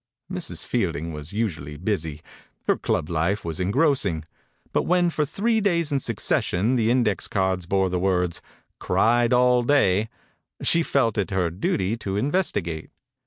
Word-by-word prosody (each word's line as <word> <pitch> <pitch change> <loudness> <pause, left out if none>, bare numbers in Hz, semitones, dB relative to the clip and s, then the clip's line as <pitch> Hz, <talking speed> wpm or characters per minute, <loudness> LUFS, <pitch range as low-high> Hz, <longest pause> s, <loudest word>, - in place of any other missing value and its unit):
Mrs. 180 -3 -4
Fielding 85 - -1
was 75 +2 -8
usually 80 -10 -3
busy. 80 -5 -3 0.4
Her - - +3
club - - -1
life 85 +5 -1
was 80 0 -4
en 90 +1 0
grossing, 130 - +1 0.5
but - - +3
when, 175 -1 +2
for 150 -2 0
three 220 +8 +1
days 170 -6 +1
in 140 - +2
succession, 115 -1 0
the 115 -2 +2
index 115 -6 +1
cards 95 -2 -1
bore 95 0 +2
the 90 - 0
words 90 -2 0 0.4
"Cried 120 +1 +2
all 125 0 +4
day," 110 -6 +2 0.5
she 170 - +4
felt 115 -9 +1
it 100 - -1
her 90 -4 0
duty 95 +4 -1
to 100 -3 -3
in 135 +8 0
vestigate. 85 - -1
105 Hz, 160 wpm, -24 LUFS, 90-130 Hz, 0.5 s, all